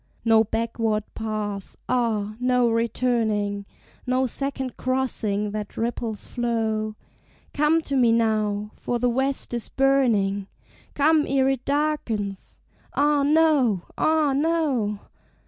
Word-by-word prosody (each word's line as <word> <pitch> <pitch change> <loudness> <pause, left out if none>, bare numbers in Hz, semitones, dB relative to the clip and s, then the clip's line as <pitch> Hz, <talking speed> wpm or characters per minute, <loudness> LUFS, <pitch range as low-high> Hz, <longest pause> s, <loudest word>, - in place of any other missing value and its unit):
No 225 -1 +5
backward 225 -1 -1
path; 210 -3 -4
ah! 220 -4 0
no 250 -1 +2
returning: 220 -3 0 0.4
No 255 +1 +2
second 265 0 -3
crossing 220 -6 -1
that 210 -1 -6
ripple's 230 -2 -3
flow: 220 -3 -1 0.6
"Come 300 +2 +2
to 280 - -3
me 245 -3 +4
now, 215 -2 +1
for 245 - -3
the 245 +1 +1
west 265 +1 0
is 235 -2 -2
burning: 225 -8 +2 0.5
Come 300 +1 +3
ere 265 0 +2
it 265 -2 -2
darkens." 275 -10 -2 0.4
"Ah, 290 0 +3
no! 285 - +3
ah, 310 -3 +2
no!" 275 -10 0
235 Hz, 110 wpm, -24 LUFS, 215-270 Hz, 0.6 s, No